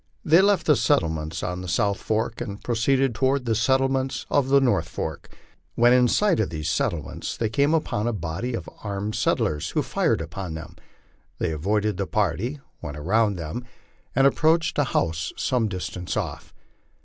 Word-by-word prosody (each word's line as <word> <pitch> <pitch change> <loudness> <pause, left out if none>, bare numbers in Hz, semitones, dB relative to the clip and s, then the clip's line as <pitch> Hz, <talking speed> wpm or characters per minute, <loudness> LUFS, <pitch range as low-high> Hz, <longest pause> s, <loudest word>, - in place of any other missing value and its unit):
They 165 +4 +6
left 200 -3 +3
the 150 - +5
settlements 80 - 0
on 90 0 -3
the 90 - -6
south 100 +4 +1
fork 110 +1 -2
and 100 0 -6
proceeded 130 +2 +1
toward 130 +2 +1
the 115 - +1
settlements 130 +3 +1
on 140 -2 +3
the 140 +1 +5
north 120 -11 +1
fork. 80 -2 -5 0.5
When 120 +1 +5
in 125 -1 +5
sight 205 - +2
of 110 - +1
these 80 0 -3
settlements, 75 -2 -2
they 115 - 0
came 140 +7 +2
upon 115 -8 -1
a - - +1
body 105 +5 -3
of - - -6 0.2
armed 100 0 -3
settlers, 75 -9 0
who - - 0
fired - - +1
upon 90 -5 -5
them; 80 +1 -8 0.6
they - - -1
avoided 105 +7 0
the 100 -2 -2
party, 105 - -1 0.2
went 75 -3 -6
around 105 +7 +2
them, 90 +8 -5 0.5
and 135 +2 +4
approached 160 +3 +3
a 145 - +3
house 80 -9 -1
some 120 -3 +1
distance 90 -2 -4
off. - - -4
110 Hz, 175 wpm, -24 LUFS, 85-130 Hz, 0.6 s, They